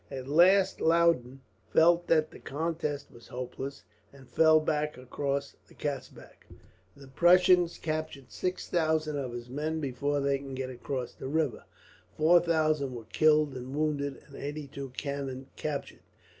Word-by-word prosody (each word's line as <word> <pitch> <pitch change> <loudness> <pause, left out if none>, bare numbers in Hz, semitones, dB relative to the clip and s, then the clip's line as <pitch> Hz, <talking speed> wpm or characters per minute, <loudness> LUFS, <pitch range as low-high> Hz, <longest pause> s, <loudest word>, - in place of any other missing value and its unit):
At 130 -1 -6
last 185 +6 +4
Loudon 160 -6 +2 0.3
felt 170 +2 +4
that 155 -2 +3
the - - -12
contest 150 -1 -3
was 120 -3 -15
hopeless, 130 +2 -6 0.3
and 135 -2 -16
fell 160 +2 +5
back 150 -2 -1
across 140 +2 -3
the - - -19
Katzbach. 145 -3 -7 0.5
The 140 -1 -13
Prussians 175 +3 +4
captured 155 -6 -4
six 185 0 -3
thousand 155 -3 0
of 130 -3 -4
his 120 0 -7
men 155 +5 -3
before 145 +1 -1
they 140 0 +1
could 135 -1 -7
get 130 0 -4
across 125 0 -5
the - - -7
river, 150 -3 -1 0.5
four 165 +3 +6
thousand 155 -5 +1
were 115 -2 -8
killed 155 -3 +4
and 130 +2 -6
wounded, 145 -2 -1
and 140 - -15
eighty 145 +1 -5
two 135 0 -7
cannons 135 -2 -4
captured. 150 -2 -5
145 Hz, 150 wpm, -29 LUFS, 135-160 Hz, 0.5 s, four